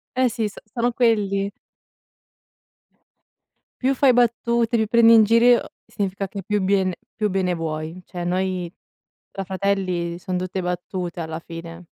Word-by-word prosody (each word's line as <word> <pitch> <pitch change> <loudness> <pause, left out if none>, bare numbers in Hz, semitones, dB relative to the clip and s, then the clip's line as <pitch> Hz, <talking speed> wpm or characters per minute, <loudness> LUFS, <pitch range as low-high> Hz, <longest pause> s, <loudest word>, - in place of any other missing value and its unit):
Eh 255 -1 +3
sì, 220 -1 -1
so - - -18
sono 240 +3 -1
quelli. 205 -5 +1 2.4
Più 270 0 +3
fai 265 -1 +5
battute, 235 0 +2
mi 220 -1 +1
prendi 230 +1 +6
in 220 -1 +8
giro 235 +2 +4
significa 195 -1 -3
che 195 -2 -7
più 210 -1 0
biene 190 -1 +2 0.2
più 215 -1 0
bene 185 -1 0
vuoi. 160 +1 -4
Cioè 175 -1 -6
noi, 180 -1 -1 0.6
tra 195 - -4
fratelli, 185 -3 -1
son 185 -1 -2
tutte 185 0 -3
battute 180 0 -4
alla 160 0 -5
fine. 165 0 -9
195 Hz, 140 wpm, -22 LUFS, 180-225 Hz, 2.4 s, in